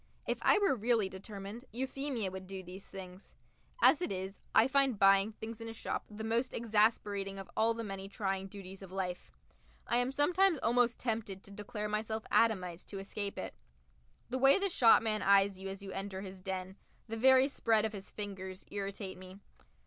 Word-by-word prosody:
If - - -1
I - - +5
were 405 -5 +3
really 225 -3 +1
determined, 200 +4 -8
Euphemia 260 -4 -2
would 190 0 -8
do 190 0 -6
these 185 +2 -10
things. 185 0 -10 0.5
As 325 - +7
it 355 - -1
is, 190 +1 -4 0.2
I 225 - +7
find 270 -3 +3
buying 195 +1 +5
things 220 +1 -8
in 230 - -5
a - - -6
shop 225 - -4
the 215 +1 -7
most 230 +3 0
exasperating 210 -3 +1
of 195 - -8
all 225 +1 +3
the 230 - -4
many 195 -2 -6
trying 195 -1 -2
duties 195 -1 -10
of 190 -2 -10
life. 180 - -4 0.5
I 240 - +1
am 245 +1 +1
sometimes 350 +5 +3
almost 240 +1 +2
tempted 220 -5 -3
to 200 - -13
declare 210 +1 -5
myself 220 +1 -2
Adamite 185 -7 +2
to 200 - -6
escape 200 +1 -3
it. - - -5 0.7
The 260 +2 -2
way 270 +5 +7
the 395 0 0
shopman 225 - +5
eyes 195 -1 +4
you 195 0 -5
as 195 +1 -7
you 195 - -7
enter 195 0 -4
his 190 -1 -8
den, 190 0 -5 0.3
the 225 - -4
very 260 +3 +6
spread 225 -6 +2
of 220 - -3
his 195 -2 -8
fingers, 190 -2 -6
irritate 195 -1 -5
me. 185 +1 -11
205 Hz, 185 wpm, -33 LUFS, 195-230 Hz, 0.7 s, As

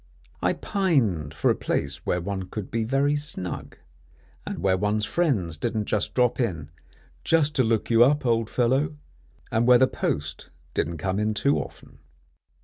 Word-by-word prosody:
I - - +2
pined 125 - 0
for 80 - +1
a - - +1
place 70 +2 -3
where 90 - +1
one 95 +1 -4
could 105 -3 -6
be 115 0 0
very 135 +5 +1
snug, 145 -12 -5 0.7
and - - -4
where 95 -1 +2
one's 105 +2 0
friends 100 - 0
didn't 110 +3 -2 0.2
drop 125 -1 +2
in 85 - -2 0.5
"just 155 -2 +3
to 130 - +5
look 115 0 0
you 115 +1 +7
up, 145 +2 +2
old 115 -2 +1
fellow," 135 +5 +1 0.5
and 115 +2 +2
where 125 -1 +8
the 130 - +5
post 75 - -3 0.2
didn't 85 +3 -1
come 95 +4 -1
in 105 0 0
too 140 +6 +2
often. - - -10
110 Hz, 160 wpm, -25 LUFS, 90-130 Hz, 0.7 s, where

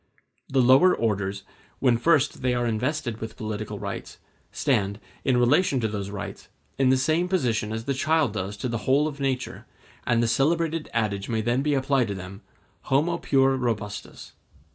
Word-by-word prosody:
The 135 -1 +3
lower 135 +9 +6
orders, 100 -3 -1 0.3
when 120 -3 +2
first 145 0 +2
they 125 -1 +1
are 120 0 0
invested 120 +1 -2
with 110 0 -6
political 110 -2 -4
rights, - - -6 0.3
stand, 100 +1 0 0.2
in 130 -2 +2
relation 135 +4 +3
to 110 - 0
those 100 -2 -4
rights, 100 0 -7 0.3
in 135 -1 +4
the 130 - +4
same 160 +7 +1
position 120 - 0
as 110 +1 -3
the 140 - 0
child 150 -2 +1
does 100 0 -4
to 115 - -3
the 115 -2 -2
whole 145 +3 +4
of 145 -2 -6
nature, 135 -2 -3 0.4
and 120 0 +3
the - - +2
celebrated 165 +5 +1
adage 105 -4 -1
may 110 -1 0
then 120 +4 +1
be 145 0 +1
applied 135 -2 +1
to 100 - -3
them, 95 +1 -9 0.4
Homo 160 +6 +1
puer 135 -1 +3
robustus. 110 -5 -4
125 Hz, 175 wpm, -25 LUFS, 110-140 Hz, 0.4 s, lower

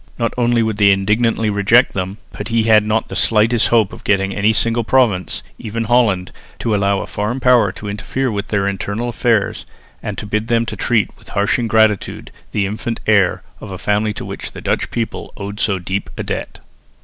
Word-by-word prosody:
Not 115 -1 -1
only 120 -1 +2
would 110 -2 -2
they 100 -1 +5
indignantly 105 +3 +2
reject 105 +5 +4
them, 95 +1 -3
but 105 - -6
he 115 -1 +1
had 110 -1 +5
not 110 +1 0
the - - -7
slightest 115 +1 +3
hope 110 -4 +2
of - - -11
getting 95 -1 +1
any 105 +2 +2
single 115 +1 +1
province, 110 -7 +1 0.2
even 115 +1 -3
Holland, 110 -6 +2 0.3
to 115 - -1
allow 100 -1 +1
a - - -5
foreign 105 +5 -3
power 120 -6 +4
to 105 - -8
interfere 120 +5 -2
with 100 0 -3
their 100 -2 0
internal 100 +4 -3
affairs 115 -3 0 0.4
and - - -5
to - - -5
bid 105 +1 -2
them 115 -1 +2
to - - -5
treat 115 -4 0
with - - -13
harsh 100 +4 +1
ingratitude 110 -3 +1 0.2
the 100 -2 0
infant 110 +4 -4
heir 100 -4 +3 0.2
of 105 - -9
a 95 - -6
family 105 +3 0
to - - -6
which - - -7
the - - -8
Dutch - - -1
people 115 -2 -4
owed 100 0 -6
so 100 -3 +1
deep 95 +2 -4
a - - -3
debt. - - -5
105 Hz, 200 wpm, -18 LUFS, 100-115 Hz, 0.4 s, they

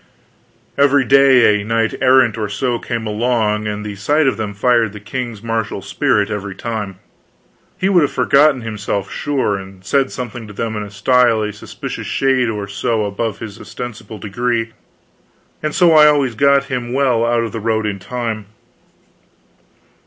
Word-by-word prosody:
Every 140 -1 +4
day 130 -6 +5
a - - -6
knight 115 +1 0
errant 130 -3 +4
or 105 -2 -3
so 120 +3 -1
came 115 -2 -4
along, 110 -1 0
and 105 0 -4
the 105 -1 -5
sight 145 +10 +1
of 135 - +2
them 105 -2 -5
fired 115 -1 +2
the 105 - -8
king's 120 0 -5
martial 115 -4 -3
spirit 105 +5 0
every 100 -2 -4
time. 110 -5 -4 0.8
He 185 0 0
would 185 -3 +4
have 145 - +1
forgotten 140 -2 +3
himself, 105 -3 -4
sure, 135 -8 -1
and 95 -1 -11
said 135 +3 +1
something 120 -2 -6
to 105 - -10
them 110 +2 -3
in 105 - -3
a 105 - -7
style 115 +1 +2
a 105 0 -3
suspicious 105 - -7
shade 130 -3 +1
or 105 -2 -4
so 105 +2 -1
above 105 +1 -3
his 105 -3 -9
ostensible 110 -3 -8
degree, 115 +3 -2 0.9
and 155 -1 -3
so 175 -2 +5
I 155 -1 +7
always 140 -5 +2
got 140 +3 +3
him 125 -3 -4
well 130 -4 +2
out 120 0 +1
of 115 - -4
the 115 - -5
road 110 0 0
in 100 -2 -3
time. 115 -1 -4
115 Hz, 170 wpm, -18 LUFS, 105-130 Hz, 0.9 s, I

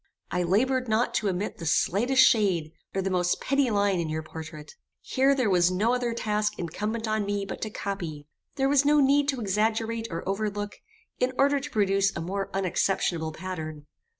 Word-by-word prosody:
I 180 - 0
laboured 250 +9 +1
not 220 +2 +1
to 210 - +1
omit 190 +2 -3
the 165 - -6
slightest 245 - +3
shade, 185 -9 +2 0.2
or 195 - 0
the 195 - -1
most 180 -1 +1
petty 275 -2 +1
line 200 -3 +2
in 165 -2 -2
your 155 0 -3
portrait. 155 -1 -9 0.3
Here 270 +1 +2
there 255 -4 +1
was 180 -2 +4
no 210 +6 +1
other 245 -1 0
task 210 -2 -1
incumbent 210 +7 -3
on 215 -1 0
me 200 0 -2
but - - -7
to 215 - -2
copy; 175 -8 -5 0.3
there 270 -1 +1
was 280 0 +4
no 295 +1 +4
need 280 +1 +4
to 270 -3 0
exaggerate 225 +2 0
or 165 +1 -5
overlook, 205 +1 -2 0.4
in 255 +1 +1
order 280 +1 +3
to 290 +2 -7
produce 195 -4 +1
a - - -3
more 195 +4 -3
unexceptionable 180 -3 0
pattern. 155 -5 -6
205 Hz, 185 wpm, -27 LUFS, 180-235 Hz, 0.4 s, was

